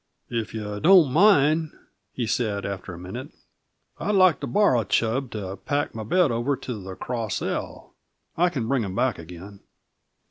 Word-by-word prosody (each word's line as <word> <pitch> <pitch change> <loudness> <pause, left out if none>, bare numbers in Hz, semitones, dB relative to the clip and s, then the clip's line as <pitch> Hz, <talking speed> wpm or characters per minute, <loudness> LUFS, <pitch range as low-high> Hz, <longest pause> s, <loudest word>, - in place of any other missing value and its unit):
"If 115 -2 -2
you 105 -1 -4
don't 170 - +6
mind," 160 -4 +4 0.4
he 120 - -3
said, 110 -3 -1
after 100 -1 -5
a 85 - -8
minute, 100 - -7 0.7
"I'd 210 - 0
like 185 -3 +5
to - - -4
borrow 195 - +3
Chub 115 +6 0
to 100 -3 -5
pack 145 -2 -2
my 110 -1 -5
bed 170 - +2
over 120 +5 0
to 115 -5 -6
the 95 0 -7
Cross 115 -3 -3
L. - - -5 0.4
I 175 +2 +3
can 130 -9 -3
bring 130 -2 +1
him 95 -2 -5
back 125 -3 0
again." 90 +4 -11
120 Hz, 170 wpm, -24 LUFS, 100-145 Hz, 0.7 s, don't